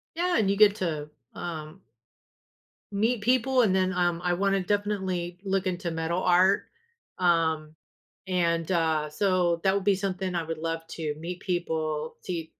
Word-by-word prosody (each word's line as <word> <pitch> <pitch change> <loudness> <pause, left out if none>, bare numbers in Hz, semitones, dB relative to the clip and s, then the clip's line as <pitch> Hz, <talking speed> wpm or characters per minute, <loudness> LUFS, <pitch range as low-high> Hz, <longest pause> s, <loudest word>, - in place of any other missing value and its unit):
Yeah, 355 +1 +1
and 200 -3 +2
you 200 - +1
get 210 -1 +6
to, 155 -4 -3 0.2
um 165 +1 -7 1.1
meet 220 +4 +1
people, 255 +2 +3
and 190 -3 +3
then, 185 0 +2
um, 175 -1 +1
I 175 0 +1
wanna 195 +1 +1
definitely 190 -3 -1
look 195 -1 0
into 175 -1 -2
metal 165 +2 -1
art, 185 +2 +4 0.6
um, 160 -3 +1 0.5
and, 170 -2 0
uh, 160 -3 +1
so 175 0 +1
that 190 0 +3
would 200 - -1
be 200 -1 +3
something 190 -1 -3
I 170 - 0
would 165 0 -4
love 165 0 -4
to 155 -3 -3
meet 175 +3 -6
people, 160 -4 -2
to 170 -3 -3
180 Hz, 155 wpm, -27 LUFS, 165-195 Hz, 1.1 s, get